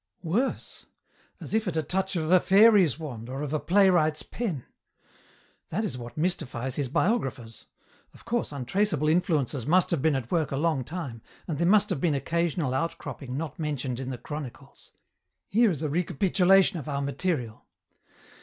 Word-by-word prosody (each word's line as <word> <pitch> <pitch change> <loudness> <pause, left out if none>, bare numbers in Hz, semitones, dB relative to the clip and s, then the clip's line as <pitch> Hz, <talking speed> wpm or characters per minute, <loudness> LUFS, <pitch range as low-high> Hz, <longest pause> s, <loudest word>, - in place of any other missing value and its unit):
"Worse. 210 +11 -2 0.5
As - - -7
if 220 -1 +1
at 165 -3 -2
a 160 - +1
touch 190 +5 -1
of 160 -1 -1
a 185 - +7
fairy's 195 - +5
wand 125 -8 -7
or 135 +3 -4
of 150 0 -4
a 155 - +1
playwright's 170 -2 +3
pen. 185 - -4 1.0
That 215 +7 -1
is 130 - -4
what 120 0 -9
mystifies 135 -7 -2
his 140 -3 -1
biographers. 130 - -1 0.4
Of - - -19
course 240 -7 -1
untraceable 155 - 0
influences 155 - +1
must 180 +3 +3
have 165 -6 +1
been 160 -1 +2
at 125 -3 -4
work 165 -4 +1
a 135 - -1
long 155 -3 +1
time, 135 -6 -6 0.3
and 155 -4 -3
there 170 - +2
must 210 +1 +4
have 140 - -2
been 160 -4 +2
occasional 165 -1 -1
outcropping 135 -3 -4
not 155 -1 -5
mentioned 135 -5 -3
in 130 -1 -4
the 130 - -4
chronicles. 145 +1 -9 0.5
Here 230 +2 +3
is 160 -4 -3
a - - +1
recapitulation 180 +3 +3
of 150 - -7
our 140 -1 -2
material. 140 -6 -3
155 Hz, 170 wpm, -27 LUFS, 135-180 Hz, 1.0 s, a